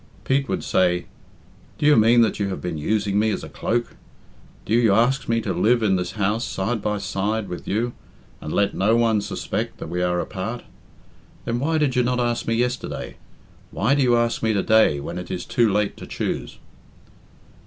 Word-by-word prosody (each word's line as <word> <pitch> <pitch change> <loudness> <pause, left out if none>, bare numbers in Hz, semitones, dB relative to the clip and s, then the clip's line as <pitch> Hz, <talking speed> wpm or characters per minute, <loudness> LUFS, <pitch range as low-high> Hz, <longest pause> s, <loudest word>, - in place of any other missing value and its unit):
Pete 135 +1 0
would - - -2
say, 90 -1 +1 0.7
"Do - - -2
you 150 0 +6
mean 115 +2 +5
that 110 -2 +1
you 100 - 0
have 95 - -4
been 85 -3 -4
using 100 +4 0
me 110 +1 +2
as 105 - -2
a - - -8
cloak? 120 +1 -2 0.7
Do 105 - -2
you 115 -4 +4
ask 125 +3 +2
me 115 0 +2
to 100 -3 -2
live 115 +7 +2
in 100 -3 +3
this 90 -1 -2
house, 105 +2 0
side 105 +4 -2
by 105 0 -1
side 100 +2 -2
with 90 - -7
you, 115 +4 -1 0.5
and 75 - -6
let 100 +3 +1
no 105 +4 +2
one 115 -3 +2
suspect - - -4
that - - -7
we 90 +1 -2
are 90 0 +1
apart? 110 +6 -4 0.8
Then 115 +1 -1
why 160 +4 +1
did 145 -4 +1
you 125 - +4
not 125 0 0
ask 120 -1 -1
me 115 - +1
yesterday? 125 +2 -3 0.5
Why 110 +7 +1
do 145 - +2
you 120 -2 +4
ask 120 0 0
me 110 -1 +1
to 100 - 0
day, 110 -10 +4
when 85 +5 -5
it 90 - -8
is 90 - -4
too 120 -4 +2
late 105 0 0
to - - -9
choose?" - - -4
110 Hz, 205 wpm, -23 LUFS, 95-120 Hz, 0.8 s, you